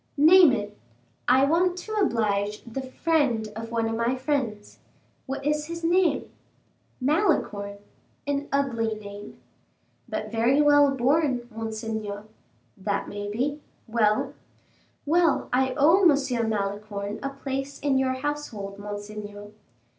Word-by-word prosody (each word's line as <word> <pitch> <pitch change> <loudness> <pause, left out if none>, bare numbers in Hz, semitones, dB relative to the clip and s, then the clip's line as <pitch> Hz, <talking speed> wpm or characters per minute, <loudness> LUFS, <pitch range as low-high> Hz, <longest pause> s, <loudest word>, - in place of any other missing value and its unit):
"Name 330 +2 +8
it." 210 -3 -3 0.5
"I 260 +2 +5
want 350 +4 +2
to 435 - -7
oblige 210 - 0
the 235 +3 -5
friend 260 -4 0
of 225 +1 -6
one 230 -1 0
of 225 - -2
my 235 +2 +1
friends." 255 -6 -3 0.5
"What's 295 +3 -1
his 335 +1 -7
name?" 350 +1 +2 0.7
"Malicorne." 255 - 0 0.5
"An 285 0 -1
ugly 230 -6 0
name." 205 -1 -10 0.7
"But 215 0 -4
very 235 +5 +3
well 290 -1 +6
borne, 270 -1 +1
monseigneur." 220 -2 -4 0.5
"That 200 +1 -2
may 205 0 -5
be. 275 +8 -2 0.2
Well?" 215 -2 +1 0.7
"Well, 330 0 +2
I 260 0 +2
owe 325 +7 +5
M. 275 - +3
Malicorne 205 0 -3
a 275 - -2
place 275 0 -5
in 275 -2 +2
your 260 -1 +1
household, 260 -8 -4
monseigneur." 205 0 -7
250 Hz, 120 wpm, -26 LUFS, 210-290 Hz, 0.7 s, Name